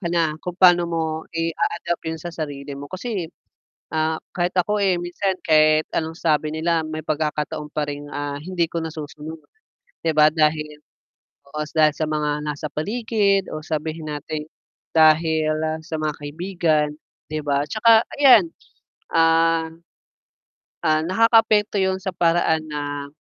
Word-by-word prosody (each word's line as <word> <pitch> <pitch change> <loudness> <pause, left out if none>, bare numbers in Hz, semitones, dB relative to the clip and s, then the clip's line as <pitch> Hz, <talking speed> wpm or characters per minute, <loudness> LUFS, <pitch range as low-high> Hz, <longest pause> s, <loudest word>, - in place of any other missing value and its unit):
ka 175 - -3
na 165 -3 +1
kung 180 -1 -5
paano 175 -2 +6
mo 165 -1 -1 0.3
i-aadapt 165 +1 -2
yun 160 0 -4
sa 175 - -6
sarili 145 -3 -5
mo. 140 +1 -8
Kasi, 190 -3 -4 0.7
ah, 160 0 0 0.2
kahit 175 0 0
ako, 210 +4 +1
eh, 190 -2 +3
minsan 180 +2 -2
kahit 155 0 +4
anong 160 0 -2
sabi 155 -2 +1
nila 165 +1 +1
may 155 0 -5
pagkakataon 150 -1 -2
pa 150 -1 -1
ring, 145 0 -6
ah, 145 0 -3
hindi 175 -1 -1
ko 170 - -3
nasusunod. 155 0 -7 0.6
'Di 165 - +1
ba? 150 0 +7
dahil 150 -1 0 0.7
oo 150 +1 -4 0.2
dahil 155 -1 +5
sa 155 - -1
mga 150 -1 -1
nasa 150 0 -4
paligid 205 +1 0
o 155 - -5
sabihin 155 0 -4
nating 150 +1 -5 0.5
dahil 160 0 +4 0.3
sa 160 -2 -4
mga 155 -1 -1
kaibigan, 155 0 0 0.4
'di 155 0 -2
ba? 140 -1 +1
'tsaka 220 +2 +5 0.2
ayan, 285 +4 +7 0.7
ah, 165 0 +3 1.2
ah, 155 0 +3
nakakaapekto 215 +1 +3
yun 190 0 +1
sa 190 - -3
paraan 165 -2 +2
na, 145 -1 -4
160 Hz, 140 wpm, -22 LUFS, 150-175 Hz, 1.2 s, ba